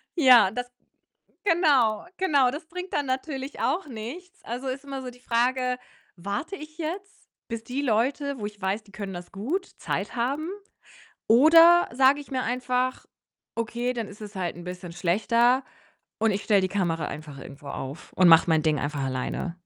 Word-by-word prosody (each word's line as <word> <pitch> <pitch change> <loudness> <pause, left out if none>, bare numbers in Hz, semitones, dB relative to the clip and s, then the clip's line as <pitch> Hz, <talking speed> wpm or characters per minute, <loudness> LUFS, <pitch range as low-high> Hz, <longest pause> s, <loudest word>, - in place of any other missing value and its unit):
Ja, 250 - +7
das 245 0 -4 0.8
genau, 290 - +3
genau, 285 -9 +3
das 305 +5 -7
bringt 360 +2 -7
dann 290 -2 0
natürlich 265 +1 -4
auch 350 +1 0
nichts. 260 +11 -9
Also, 250 +3 -4
ist 270 +2 -4
immer 275 -1 -5
so 250 - -6
die 245 0 -18
Frage: 250 +1 +1 0.4
Warte 200 - -4
ich 310 -1 -11
jetzt, 370 +5 -6 0.2
bis 230 -1 -4
die 255 +4 -3
Leute, 270 +3 0
wo - - -4
ich 205 -1 -9
weiß, 195 +3 -1
die 200 - -20
können 195 -2 -6
das 175 0 -9
gut, 290 - -2
Zeit - - -3
haben? 280 +8 -1 0.8
Oder 330 +8 +7
sage 265 +3 +4
ich 280 - -15
mir 255 -1 -1
einfach: 250 +1 -1 0.5
„Okay, 235 +2 -2
dann 230 -3 -4
ist 205 +2 -13
es 210 0 -9
halt 175 -3 -2
'n 175 - -9
bisschen 180 -1 -7
schlechter 230 +9 +2 0.6
und 220 0 +3
ich 200 +1 -2
stelle 205 -3 +4
die 185 - 0
Kamera 170 -5 -1
einfach 150 -2 -8
irgendwo 140 +1 -11
auf 135 +2 -7
und 185 -1 +5
mache 165 +1 +7
mein 160 -1 +3
Ding 155 -3 +2
einfach 145 -1 -2
alleine?“ 130 +6 -3
245 Hz, 175 wpm, -26 LUFS, 195-280 Hz, 0.8 s, Ja